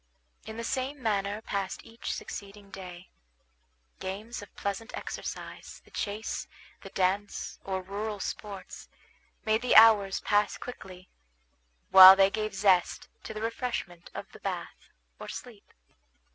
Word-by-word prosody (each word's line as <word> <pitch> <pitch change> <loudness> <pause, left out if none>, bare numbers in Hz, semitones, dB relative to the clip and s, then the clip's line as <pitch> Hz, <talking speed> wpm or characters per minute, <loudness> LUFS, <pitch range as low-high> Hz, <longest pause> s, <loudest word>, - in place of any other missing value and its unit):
In 220 - -7
the 230 - -4
same 265 +4 -2
manner 205 0 -1
passed 195 -3 -3
each 230 +1 -6
succeeding 200 0 -8
day. 180 -2 -10 0.9
Games 205 +5 -5
of 205 - -12
pleasant 200 +4 -4
exercise, - - -7
the - - -21
chase, 210 +2 -4 0.3
the - - -10
dance, 195 +2 -1
or 190 -1 -3
rural 205 +2 -4
sports, 195 -1 -7 0.6
made 220 +1 +2
the 250 - +2
hours 215 -3 +7
pass 205 0 +2
quickly; 185 -7 -10 0.8
while 190 0 +12
they 195 0 +4
gave 215 -1 -3
zest 190 -3 +2 0.2
to - - -5
the 215 - -4
refreshment 230 -7 -4
of - - -5
the - - -13
bath, - - -6 0.3
or - - -8
sleep. - - -9
205 Hz, 130 wpm, -29 LUFS, 190-220 Hz, 0.9 s, while